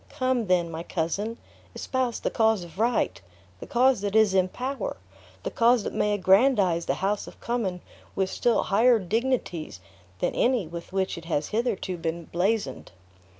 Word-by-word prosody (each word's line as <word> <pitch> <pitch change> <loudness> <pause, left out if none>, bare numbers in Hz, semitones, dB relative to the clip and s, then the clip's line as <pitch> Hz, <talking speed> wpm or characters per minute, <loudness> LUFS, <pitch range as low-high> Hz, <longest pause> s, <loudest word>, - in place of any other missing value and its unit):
Come, 255 -4 0
then, 175 -2 +2
my 160 0 -5
cousin! 190 +7 -2 0.4
espouse 255 -3 -2
the - - -2
cause 220 -4 +2
of 170 +2 -12
right; 220 - +1 0.4
the - - -9
cause 250 -2 +3
that 205 0 -2
is 220 -3 +5
in 185 -1 +3
power; 255 - -4 0.5
the - - -3
cause 235 -1 +3
that - - -4
may 210 - +1
aggrandize 190 -3 +3
the - - +1
house 205 +1 -1
of - - -12
Cummin 205 -7 -2 0.3
with 190 -1 0
still 240 - +2
higher 235 +4 +4
dignities 215 - -2 0.4
than - - -1
any 245 -6 +2
with 170 +2 -8
which 190 -2 -1
it 165 - -14
has 155 -3 -1
hitherto 215 -5 -1
been 165 0 -4
blazoned." 180 - -1
200 Hz, 165 wpm, -26 LUFS, 175-235 Hz, 0.5 s, is